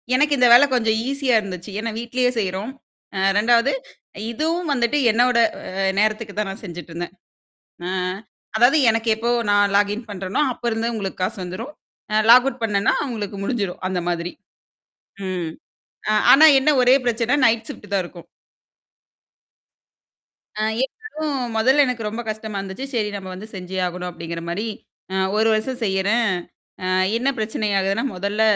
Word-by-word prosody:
எனக்கு 295 Hz, +2 st, +3 dB
இந்த 250 Hz, -1 st, +5 dB
வேலை 245 Hz, +4 st, +8 dB
கொஞ்சம் 225 Hz, -3 st, +2 dB
ஈஸியா 275 Hz, -3 st, +1 dB
இருந்துச்சு. 185 Hz, -2 st, -7 dB
ஏன்னா 230 Hz, +1 st, -3 dB
வீட்டிலேயே 250 Hz, +1 st, 0 dB
செய்றோம். 195 Hz, +3 st, -3 dB, 0.4 s
அ -, -, -1 dB, 0.2 s
2வது 235 Hz, +5 st, +4 dB, 0.6 s
இதுவும் 325 Hz, +7 st, -1 dB
வந்துட்டு 245 Hz, +2 st, +1 dB
என்னோட 245 Hz, +2 st, +3 dB, 0.4 s
அ 190 Hz, 0 st, +2 dB
நேரத்துக்கு 215 Hz, 0 st, 0 dB
தான் 210 Hz, -2 st, -1 dB
நான் 195 Hz, -, -10 dB
செஞ்சுட்ருந்தேன். 175 Hz, -1 st, -7 dB, 0.7 s
அ -, -, -3 dB, 0.7 s
அதாவது 245 Hz, +7 st, +5 dB
எனக்கு 225 Hz, +1 st, 0 dB
எப்போ 230 Hz, +2 st, -2 dB, 0.2 s
நான் 205 Hz, 0 st, +3 dB
லாகின் 205 Hz, +3 st, +1 dB
பண்ணுறேனோ, 195 Hz, +3 st, -2 dB
அப்போருந்தே 235 Hz, -1 st, -2 dB
உங்களுக்கு 195 Hz, -4 st, -5 dB
காசு 185 Hz, -, -1 dB
வந்துரும், 185 Hz, +10 st, -6 dB, 0.4 s
அ -, -, +2 dB
லாக் 250 Hz, +2 st, +8 dB
அவுட் 255 Hz, -2 st, -4 dB
பண்ணேன்னா 200 Hz, -3 st, +2 dB
அவங்களுக்கு 215 Hz, -7 st, -5 dB
முடிஞ்சிடும் 200 Hz, -4 st, -2 dB
அந்த 185 Hz, -1 st, -1 dB
மாதிரி. 175 Hz, 0 st, -2 dB, 1.0 s
ம். 175 Hz, -3 st, -3 dB, 0.6 s
அ -, -, +3 dB, 0.2 s
ஆனா 305 Hz, +4 st, +8 dB
என்ன 270 Hz, +3 st, +2 dB
ஒரே 250 Hz, +1 st, +6 dB
பிரச்சனை, 235 Hz, +1 st, +1 dB
நைட் 225 Hz, -1 st, +2 dB
ஷிஃப்ட் 205 Hz, -, -10 dB
தான் 195 Hz, -2 st, +2 dB
இருக்கும். 175 Hz, -1 st, -12 dB, 2.3 s
ஆ -, -, 0 dB, 0.2 s
எனக்கும் 310 Hz, -, -4 dB, 0.2 s
முதல்ல 265 Hz, +6 st, +5 dB
எனக்கு 235 Hz, -4 st, -3 dB
ரொம்ப 225 Hz, +3 st, -5 dB
கஷ்டமா 215 Hz, -1 st, -5 dB
இருந்துச்சு. 195 Hz, +7 st, -6 dB
சரி 215 Hz, -3 st, 0 dB
நம்ம 190 Hz, -2 st, -7 dB
வந்து 200 Hz, +4 st, -9 dB
செஞ்சே 185 Hz, 0 st, -6 dB
ஆகணும் 180 Hz, 0 st, -5 dB
அப்படிங்கிற 170 Hz, -1 st, -6 dB
மாதிரி 195 Hz, +6 st, -2 dB, 0.5 s
அ -, -, -1 dB, 0.2 s
ஒரு 220 Hz, +1 st, +3 dB
வருஷம் 245 Hz, +4 st, -2 dB
செய்யறேன். 205 Hz, +3 st, +1 dB, 0.5 s
அ -, -, -1 dB, 0.3 s
என்ன 255 Hz, +4 st, +1 dB
பிரச்சனை 215 Hz, 0 st, -2 dB
ஆகுதுன்னா 195 Hz, +3 st, 0 dB
முதல்ல 200 Hz, +4 st, -2 dB
220 Hz, 150 wpm, -21 LUFS, 195-245 Hz, 2.3 s, வேலை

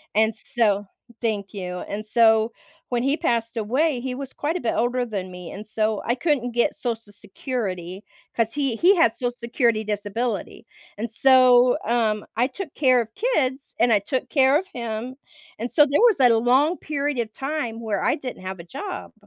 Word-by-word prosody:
and 220 Hz, +1 st, +3 dB
so 210 Hz, -3 st, 0 dB, 0.4 s
thank 210 Hz, -4 st, -2 dB
you. 180 Hz, -2 st, -5 dB
And 210 Hz, +2 st, -4 dB
so 220 Hz, 0 st, +4 dB, 0.4 s
when 245 Hz, -1 st, 0 dB
he 275 Hz, +3 st, +1 dB
passed 230 Hz, -4 st, -1 dB
away, 255 Hz, +6 st, +1 dB
he 250 Hz, 0 st, -4 dB
was 270 Hz, 0 st, -7 dB
quite 305 Hz, +3 st, -2 dB
a -, -, -1 dB
bit 235 Hz, -, 0 dB
older 245 Hz, +2 st, 0 dB
than 195 Hz, -5 st, -5 dB
me, 180 Hz, -1 st, -9 dB
and 210 Hz, +2 st, -8 dB
so 215 Hz, -1 st, -1 dB
I 240 Hz, -, +1 dB
couldn't 260 Hz, -4 st, 0 dB
get 240 Hz, +5 st, +1 dB
Social 230 Hz, -6 st, -4 dB
Security 200 Hz, -3 st, -5 dB, 0.3 s
'cause 230 Hz, -1 st, 0 dB
he 275 Hz, -5 st, -1 dB
he 360 Hz, -, +5 dB
had 235 Hz, -11 st, +4 dB
Social 245 Hz, -1 st, -2 dB
Security 235 Hz, -2 st, 0 dB
disability, 210 Hz, +2 st, -3 dB, 0.3 s
and 225 Hz, +3 st, -3 dB
so, 250 Hz, 0 st, +5 dB
um, 220 Hz, -2 st, +1 dB
I 245 Hz, +2 st, +3 dB
took 300 Hz, +3 st, -7 dB
care 255 Hz, -4 st, +4 dB
of 220 Hz, -1 st, -8 dB
kids 285 Hz, -, -1 dB
and 240 Hz, +1 st, +4 dB
I 210 Hz, -, +4 dB
took 255 Hz, +6 st, -3 dB
care 270 Hz, 0 st, +4 dB
of 375 Hz, -, -8 dB
him, 235 Hz, +2 st, -5 dB, 0.4 s
and 235 Hz, +2 st, -4 dB
so 295 Hz, -, +6 dB
there 285 Hz, +4 st, +1 dB
was 455 Hz, -9 st, +5 dB
a 245 Hz, -3 st, +5 dB
long 265 Hz, +9 st, +3 dB
period 290 Hz, -3 st, -2 dB
of 220 Hz, -2 st, -3 dB
time 270 Hz, -5 st, -3 dB
where 215 Hz, -4 st, -2 dB
I -, -, +2 dB
didn't 255 Hz, -7 st, -7 dB
have 190 Hz, 0 st, -6 dB
a -, -, -8 dB
job, 285 Hz, -, -7 dB
240 Hz, 190 wpm, -23 LUFS, 215-265 Hz, 0.4 s, so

